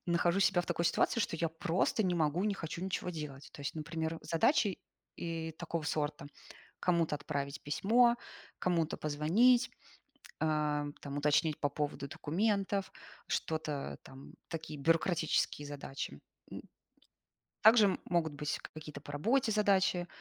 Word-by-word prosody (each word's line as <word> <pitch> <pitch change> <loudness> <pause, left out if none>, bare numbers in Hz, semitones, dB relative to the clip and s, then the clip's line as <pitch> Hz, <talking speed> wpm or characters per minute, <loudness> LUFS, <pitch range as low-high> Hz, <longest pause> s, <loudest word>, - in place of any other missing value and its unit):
нахожу 175 +2 +2
себя 190 -2 +4
в - - -7
такой 170 - -1
ситуации, 230 +6 +2
что 165 - -1
я 165 0 0
просто 165 +6 0
не 180 -2 +1
могу, 160 +2 +1
не 205 -2 +1
хочу 170 0 -5
ничего 185 -1 -2
делать. 150 -4 -7
То - - -11
есть, 140 - -3
например, 160 +1 -3
задачи, 195 - +2 0.4
и 165 -1 -4
такого 170 0 -4
сорта- 145 -2 -2 0.5
кому-то 170 -4 +2
отправить 140 -2 -4
письмо, 235 +10 +4 0.4
кому-то 170 -3 +1
позвонить, 200 - +3 0.7
а, 150 -1 +1
там, 140 0 -6
уточнить 150 +1 +2
по 145 - +1
поводу 145 -1 -3
документов, 195 +5 0 0.3
что-то, 155 -3 -2
там, 135 +1 -12
такие, 160 -2 -6
бюрократические 160 -1 +1
задачи. 140 - -6 0.3
М. - - -6 1.0
Также 220 0 +8
м - - -1
могут 170 -3 +1
быть 150 +1 -3 0.2
какие-то 150 -2 -8
по - - -10
работе 230 - +2
задачи, 195 -4 +3
165 Hz, 135 wpm, -33 LUFS, 150-185 Hz, 1.0 s, Также